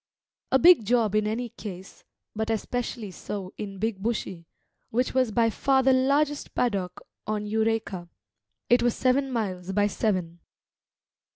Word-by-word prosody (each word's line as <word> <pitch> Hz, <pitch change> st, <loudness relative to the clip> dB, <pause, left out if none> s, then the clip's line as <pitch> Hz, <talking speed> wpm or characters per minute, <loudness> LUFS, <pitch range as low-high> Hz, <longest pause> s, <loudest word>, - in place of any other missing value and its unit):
A 265 Hz, -, +6 dB
big 340 Hz, -3 st, +7 dB
job 225 Hz, -1 st, +2 dB
in 215 Hz, 0 st, +2 dB
any 235 Hz, +3 st, -2 dB
case, 190 Hz, -3 st, -9 dB, 0.3 s
but 220 Hz, +1 st, -2 dB
especially 225 Hz, -1 st, -3 dB
so 190 Hz, 0 st, -6 dB
in 200 Hz, -2 st, -6 dB
Big 215 Hz, 0 st, -2 dB
Bushy, 190 Hz, -6 st, -3 dB, 0.4 s
which 250 Hz, +3 st, 0 dB
was 255 Hz, -3 st, +2 dB
by 230 Hz, +1 st, +2 dB
far 265 Hz, +3 st, +2 dB
the 265 Hz, 0 st, +5 dB
largest 285 Hz, +3 st, +1 dB
paddock 195 Hz, -7 st, -1 dB, 0.3 s
on 210 Hz, -1 st, -2 dB
Eureka; 220 Hz, -4 st, -1 dB, 0.6 s
it 245 Hz, 0 st, +4 dB
was 240 Hz, -1 st, +2 dB
seven 265 Hz, +1 st, +1 dB
miles 190 Hz, -6 st, -3 dB
by 205 Hz, +1 st, +3 dB
seven. 185 Hz, -5 st, -1 dB
220 Hz, 145 wpm, -26 LUFS, 200-245 Hz, 0.6 s, big